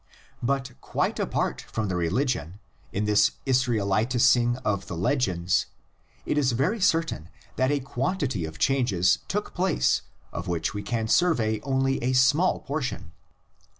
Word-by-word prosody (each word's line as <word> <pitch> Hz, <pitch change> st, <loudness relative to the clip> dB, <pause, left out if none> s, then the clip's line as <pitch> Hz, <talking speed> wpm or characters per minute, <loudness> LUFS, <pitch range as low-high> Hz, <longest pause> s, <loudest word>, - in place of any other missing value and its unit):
But 135 Hz, +1 st, -1 dB
quite -, -, -1 dB
apart -, -, -1 dB
from 110 Hz, -1 st, -4 dB
the 90 Hz, -, -2 dB
religion, 95 Hz, -, -1 dB, 0.3 s
in 105 Hz, +2 st, -1 dB
this 105 Hz, 0 st, +3 dB
Israelitising 120 Hz, 0 st, +2 dB
of 100 Hz, -2 st, -1 dB
the 85 Hz, -, -5 dB
legends 95 Hz, -, +1 dB, 0.6 s
it 150 Hz, -, +1 dB
is 130 Hz, -4 st, +2 dB
very 140 Hz, -, 0 dB
certain 165 Hz, -, +1 dB, 0.3 s
that 130 Hz, 0 st, +1 dB
a 145 Hz, 0 st, +1 dB
quantity 130 Hz, -, -2 dB
of 80 Hz, 0 st, -8 dB
changes 115 Hz, -10 st, +2 dB
took -, -, -3 dB
place 60 Hz, +1 st, +1 dB, 0.3 s
of -, -, -5 dB
which 85 Hz, -2 st, -1 dB
we 105 Hz, -, -4 dB
can 110 Hz, +2 st, -2 dB
survey 115 Hz, -9 st, +2 dB
only 135 Hz, +1 st, 0 dB
a 125 Hz, +2 st, 0 dB
small 135 Hz, +8 st, +3 dB
portion. 140 Hz, -2 st, -4 dB
120 Hz, 140 wpm, -26 LUFS, 100-135 Hz, 0.6 s, this